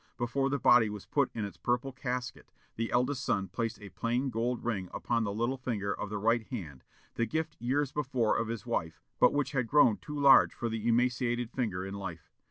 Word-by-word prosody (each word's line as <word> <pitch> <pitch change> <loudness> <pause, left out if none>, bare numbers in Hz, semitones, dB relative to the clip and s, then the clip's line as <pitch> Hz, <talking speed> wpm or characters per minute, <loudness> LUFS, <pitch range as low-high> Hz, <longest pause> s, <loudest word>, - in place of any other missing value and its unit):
Before 135 +3 0
the 140 - 0
body 120 -5 +5
was 105 -1 -7
put 140 -3 +1
in 110 -3 -2
its 100 - -8
purple 125 +3 -1
casket, 125 -1 -5 0.2
the 115 0 -2
eldest 130 +3 +1
son 95 -3 0
placed 115 +4 -3
a 105 -2 -10
plain 120 +6 -1
gold 120 +2 -1
ring 95 -6 -2
upon 115 -1 0
the 100 - -2
little 120 +6 -1
finger 105 -6 -2
of 105 - -5
the 105 - -3
right 115 +3 +2
hand, 80 - -7 0.3
the 115 - 0
gift 160 +5 -2
years 135 +3 0
before 130 -6 0
of 115 - 0
his 115 +1 -5
wife, 80 -9 -2 0.2
but - - +6
which 145 -1 0
had 125 -5 0
grown 125 -6 +5
too 145 +10 -6
large 140 -2 +6
for 120 - -2
the 110 0 -3
emaciated 120 0 +1
finger 100 -8 -2
in 95 - -6
life. 95 -4 -7
120 Hz, 210 wpm, -31 LUFS, 105-130 Hz, 0.3 s, but